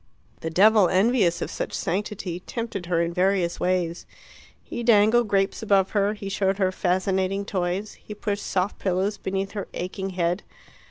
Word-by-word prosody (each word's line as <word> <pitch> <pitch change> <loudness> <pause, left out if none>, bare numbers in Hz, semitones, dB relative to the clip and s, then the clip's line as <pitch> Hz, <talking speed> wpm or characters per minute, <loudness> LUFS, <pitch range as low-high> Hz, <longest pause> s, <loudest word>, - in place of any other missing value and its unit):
The 160 - -4
devil, 200 +2 +5
envious 190 -3 +2
of - - -5
such - - -4
sanctity, 185 -2 -3
tempted 215 -3 -5
her 170 -1 +2
in 170 0 -2
various 180 -1 +1
ways. 175 -2 -1 0.6
He - - -6
dangled 230 0 +4
grapes 195 +1 +1
above 200 -3 +2
her, 205 0 +1
he 205 -1 -7
showed 195 0 0
her 190 -2 +2
fascinating 190 +2 0
toys, 190 +2 -2
he 210 - -8
pushed 205 -1 -3
soft 190 +2 -1
pillows 190 +2 -1
beneath 195 +1 -2
her 205 -2 -5
aching 190 +2 -4
head. 175 +2 +1
195 Hz, 160 wpm, -25 LUFS, 180-205 Hz, 0.6 s, devil